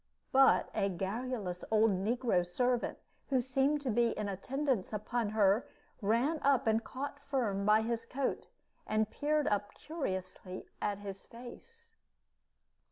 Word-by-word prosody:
But 270 0 +5
a 200 - +1
garrulous 195 0 -3
old 220 0 +4
negro 205 0 +1
servant, 245 +7 0 0.3
who 265 -2 +3
seemed 270 +4 +1
to 265 -4 -1
be 235 +1 +2
in 210 - -2
attendance 255 +3 -1
upon 215 +1 -1
her, 210 +1 +3 0.3
ran 235 +10 +2
up 275 -2 +3
and 220 0 +2
caught 280 +3 -5
Firm 240 -9 -1
by 215 +1 +5
his 230 0 -2
coat, 265 +2 -2 0.4
and 215 0 +1
peered 300 0 +1
up 205 0 -1
curiously 185 - -5 0.2
at 205 -1 0
his 195 -1 -8
face. 460 - -12
230 Hz, 135 wpm, -33 LUFS, 205-265 Hz, 0.4 s, But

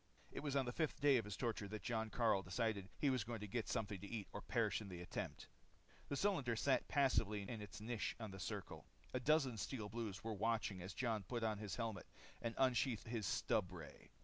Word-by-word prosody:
It - - -4
was 145 -2 -1
on 135 -2 +4
the 120 - -1
fifth 155 +3 0
day 140 -2 +6
of 115 - 0
his 105 -3 -4
torture 115 -4 -1
that 110 +1 -5
Jon 110 -2 0
Karyl 110 -4 +3
decided 100 +2 0
that - - -18
he 140 - +3
was 130 -4 +2
going 115 +1 -4
to 105 - -3
get 115 +2 -1
something 105 -5 -1
to 100 - -6
eat 110 -3 -3
or - - -4
perish - - +1
in 105 - -7
the 90 -2 -5
attempt. 90 0 -4 0.6
The 140 - 0
cylinder 140 - +2
sat 130 +3 +3
passively 115 -7 +3
in 110 +1 -4
its 105 -3 -7
niche 110 0 -1
in 110 -3 -4
the 95 - -7
circle. 90 - -4 0.3
A 130 - +1
dozen 135 -3 +3
Steel 110 -1 -2
Blues 105 -4 -3
were 110 0 -1
watching 105 -2 +1
as 90 +2 -6
Jon 115 -4 +1
put 120 +4 -3
on 110 -2 +1
his 105 -2 -3
helmet 115 -3 -2 0.3
and 115 -1 -2
unsheathed 130 -3 +3
his 110 -4 -1
stubray. 90 -6 -1
110 Hz, 225 wpm, -42 LUFS, 100-125 Hz, 0.6 s, day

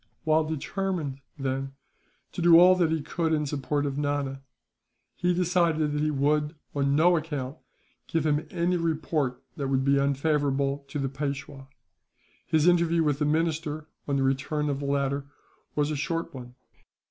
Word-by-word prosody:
While 155 0 +3
determined, 160 -2 -3 0.2
then, 135 0 -3 0.6
to - - -5
do 170 -1 +8
all 180 +1 +8
that 170 -3 +3
he 160 -2 -1
could 160 +2 -1
in 150 -1 +1
support 145 0 -1
of 140 0 -2
Nana; 145 -2 -2 0.7
he 180 0 +1
decided 170 -4 +2
that 150 0 -1
he 155 - +1
would, 150 +2 +1 0.2
on 140 -1 +1
no 175 +4 +5
account, 150 -3 -3 0.5
give 165 -2 0
him 150 0 +1
any 175 +1 0
report 155 -5 -1
that 140 - -2
would 135 0 +1
be 140 0 +4
unfavourable 140 0 0
to 145 - -5
the 135 -1 -1
Peishwa. 140 0 -5 0.8
His 160 0 +3
interview 170 -1 +4
with 145 -2 +1
the 150 - +1
minister, 155 0 -1 0.2
on 140 - 0
the 135 - +1
return 145 +3 0
of 140 - -3
the 140 - -4
latter, 140 0 0 0.5
was 150 0 +1
a - - -1
short 165 +4 -2
one. 125 -2 -9
150 Hz, 165 wpm, -27 LUFS, 140-160 Hz, 0.8 s, do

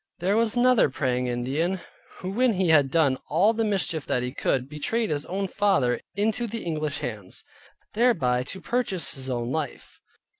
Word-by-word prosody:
There 185 +4 +1
was 225 0 +2
another 250 - +4
Praying 125 -2 -1
Indian, 140 +10 -1 0.4
who 185 - -5
when 245 +3 +2
he 185 -2 +1
had 145 -4 +5
done 140 -3 +2
all 190 +9 +4
the 225 0 0
mischief 190 -7 0
that 125 - 0
he 125 - -3
could, 130 -2 0
betrayed 165 +8 -1
his 145 -1 -2
own 195 +2 -2
father 180 - +1
into 220 +4 0
the 230 +1 -5
English 155 -3 -2
hands, 105 -9 -5 0.5
thereby 165 - +2
to 190 +7 -6
purchase 235 -8 0
his 135 -2 -4
own 120 -1 -2
life. 155 +1 -4
165 Hz, 175 wpm, -26 LUFS, 130-210 Hz, 0.5 s, had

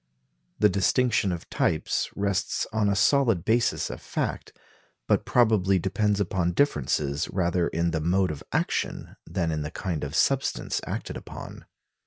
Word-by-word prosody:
The 105 - +5
distinction 100 +2 +2
of 85 -2 -5
types 80 - 0
rests 100 -1 -1
on 110 -2 +2
a 100 - +1
solid 115 - +3
basis 115 +2 +1
of - - -8
fact, - - -3 0.6
but - - +2
probably 105 -5 +3
depends 100 +3 0
upon 90 -2 0
differences 75 - 0
rather 90 -2 +1
in 85 +1 0
the 80 -1 -1
mode 90 +3 +2
of 75 - -7
action - - -2
than 85 -3 -1
in 75 -1 -2
the 75 - -3
kind 85 -2 -4
of 70 +2 -4
substance 135 +9 +1
acted - - -4
upon. - - -10
95 Hz, 150 wpm, -26 LUFS, 85-105 Hz, 0.6 s, The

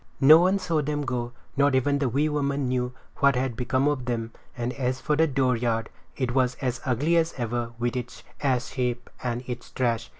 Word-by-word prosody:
No 150 +4 +9
one 185 +3 +3
saw 170 -5 0
them 145 0 -2
go, 125 -3 -2 0.2
not 140 -1 +3
even 140 +2 +2
the 135 -3 +1
wee 140 +6 +1
woman 140 -2 0
knew 125 0 0 0.3
what 140 -1 +4
had 125 -1 -1
become 130 +3 +1
of 145 -4 0
them; 115 -2 -2 0.3
and 120 +1 -2
as 130 -1 -1
for 150 - 0
the 160 +2 +4
dooryard, 125 -5 0 0.3
it 130 -3 -1
was 130 -1 +2
as 125 -3 -3
ugly 145 +7 +2
as 165 0 +1
ever 120 -1 -2
with 120 +1 -1
its 125 -1 -5 0.2
ash 125 -4 0
heap 125 -2 -2
and 120 0 -2
its 125 -1 -6
trash. 120 -3 -1
130 Hz, 200 wpm, -26 LUFS, 120-140 Hz, 0.3 s, No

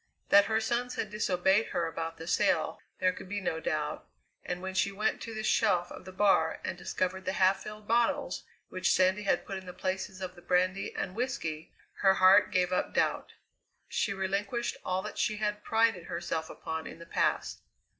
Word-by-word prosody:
That 200 0 +7
her 220 +1 +1
sons 240 +2 -1
had 210 - -3
disobeyed 195 0 +2
her 170 - -1
about 165 0 -4
the 165 - -8
sail 175 -3 +1 0.2
there 185 0 +2
could 185 - -10
be 205 +1 -2
no 170 -4 -2
doubt, 155 -2 -2 0.4
and 180 - -3
when 190 +1 -5
she 190 +1 +1
went 210 +2 -1
to 225 -1 -6
the 215 - -4
shelf 190 -5 +2
of - - -10
the 185 - -8
bar 195 +1 +3
and - - -3
discovered 185 +1 -2
the 185 - -1
half 190 0 +3
filled 210 0 -9
bottles 240 +5 +1 0.3
which 185 - +1
Sandy 185 +2 +3
had 200 - +1
put 195 -1 -4
in 190 - -14
the 180 - -7
places 190 +1 -3
of 185 -1 -5
the 175 - -15
brandy 185 +2 +1
and 185 - -3
whisky, 175 -10 -3 0.3
her 190 -1 +5
heart 190 +2 +6
gave 180 0 +2
up - - -1
doubt. - - 0 0.5
She - - 0
relinquished 200 +5 -1
all 185 +1 -1
that - - -6
she 215 - +1
had 210 0 -2
prided 225 -5 +2
herself 170 -2 -3
upon 160 0 -5
in - - -9
the 170 - -11
past. - - 0
190 Hz, 195 wpm, -30 LUFS, 180-210 Hz, 0.5 s, That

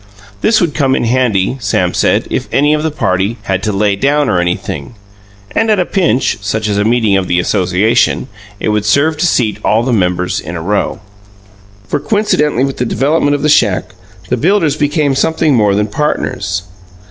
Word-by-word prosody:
This 215 - +3
would 170 -5 0
come 135 -3 +1
in - - -1
handy, 120 -2 +1
Sam 95 -5 0
said, - - +1
if - - -2
any 145 +2 +3
of 150 - 0
the 160 - 0
party 100 -6 -1
"had 95 -1 -1
to 105 0 -1
lay 100 0 +1
down 140 +5 +1
or 90 - +1
anything", 90 +1 -3 0.6
and 225 - 0
at 215 - +3
a 180 - +1
pinch 160 - 0
(such 105 +2 -2
as 100 -1 0
a - - +2
meeting 110 -2 +2
of 95 -1 -2
the 90 0 +1
association) 105 +7 +1 0.3
it - - -1
would 105 -1 0
serve 145 +9 +2
to 175 - +1
seat 110 -9 0
all 110 +2 +2
the 125 0 0
members 90 -3 0
in 85 +3 -7
a - - -4
row. 100 +3 -1 0.9
For, - - -1
coincidentally 150 - +1
with 135 0 -2
the - - -1
development 145 +4 +1
of 145 - -4
the - - +2
shack, 105 -11 +2 0.4
the 125 - 0
builders 165 - +2
became 145 -1 0
something 160 +2 +1
more 105 -5 +2
than 105 +1 +1
partners. 105 -6 -2
120 Hz, 195 wpm, -13 LUFS, 100-150 Hz, 0.9 s, This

